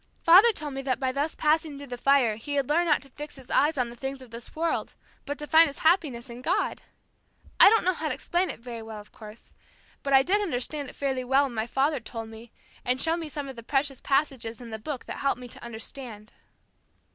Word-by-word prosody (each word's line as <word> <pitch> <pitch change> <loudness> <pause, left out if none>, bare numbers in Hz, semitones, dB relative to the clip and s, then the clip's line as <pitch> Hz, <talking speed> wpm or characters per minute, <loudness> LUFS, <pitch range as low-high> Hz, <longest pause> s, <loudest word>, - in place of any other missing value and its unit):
Father 380 +8 +8
told 300 -8 -6
me 270 - -4
that 265 -2 -1
by 260 -2 0
thus 285 +4 -2
passing 310 -1 +1
through 285 - -8
the 250 -2 -6
fire 255 -3 +3
he 285 +7 -5
had 275 -2 +1
learned 340 +4 +2
not 300 - +3
to 275 - -15
fix 295 +3 -8
his 265 -3 -12
eyes 300 +1 +3
on 245 -2 0
the - - -11
things 270 +2 -5
of 255 -3 -13
this 230 0 -10
world, 330 +1 -1 0.3
but 285 +1 -3
to 300 - -5
find 320 +2 +6
his 280 - -7
happiness 300 -8 +2
in 240 0 -9
God. - - 0 0.8
I - - +10
don't 450 +1 +3
know 370 - +3
how 315 -2 -3
to - - -1
explain 355 +2 0
it - - -5
very 235 -1 -7
well, 220 -1 -8
of 210 - -14
course; 215 +1 -13 0.5
but 275 - -3
I 270 -1 +7
did 400 +7 +2
understand 290 -4 -3
it - - -13
fairly 265 -2 -1
well 265 +3 +3
when 270 -3 -3
my 220 0 -2
father 275 +4 +1
told 225 -1 -7
me 225 +1 -12 0.3
and 250 +1 0
showed 325 +4 +1
me 325 -3 -5
some 290 -1 -5
of 265 - -7
the 230 - -8
precious 270 +2 -1
passages 270 -5 0
in 240 -2 -10
the 220 - -5
Book 275 +4 -5
that - - -6
helped 275 -3 0
me 250 - -8
to - - -10
understand." 225 -1 -8
270 Hz, 245 wpm, -27 LUFS, 240-300 Hz, 0.8 s, I